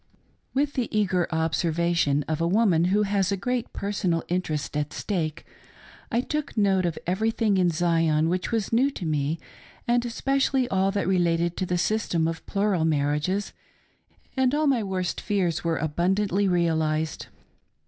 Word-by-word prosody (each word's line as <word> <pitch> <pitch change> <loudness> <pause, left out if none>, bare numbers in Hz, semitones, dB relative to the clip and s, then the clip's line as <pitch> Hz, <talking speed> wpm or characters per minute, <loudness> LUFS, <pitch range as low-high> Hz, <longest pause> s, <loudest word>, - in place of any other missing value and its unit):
WITH 285 +1 +1
the 235 -5 -1
eager 185 -4 +1
observation 160 -2 +1
of 155 0 -2
a 165 - +2
woman 180 -4 +3
who 200 +4 +2
has 200 -2 +1
a 200 - 0
great 245 +4 -2
personal 185 -5 -1
interest 165 -6 -2
at 150 0 -2
stake, 160 -7 -3 0.7
I 235 - +2
took 300 -1 -4
note 190 -3 +3
of 165 - -3
everything 210 +2 +1
in 180 -1 +3
Zion 165 -2 +2
which 180 +5 -1
was 225 -1 -1
new 255 +5 +4
to 215 -10 -7
me, 150 0 0 0.5
and 240 0 +2
especially 270 +2 0
all 190 0 +2
that 200 -1 -1
related 170 -2 +1
to 185 - -2
the 180 - 0
system 175 -4 0
of 165 0 -4
plural 195 -4 +1
marriages, 150 +5 0 0.8
and 265 0 +2
all 305 +1 +1
my 270 -5 +3
worst 185 -3 -2
fears 190 -6 0
were 165 -1 0
abundantly 190 +6 +1
realised. 160 -3 0
185 Hz, 155 wpm, -25 LUFS, 165-210 Hz, 0.8 s, new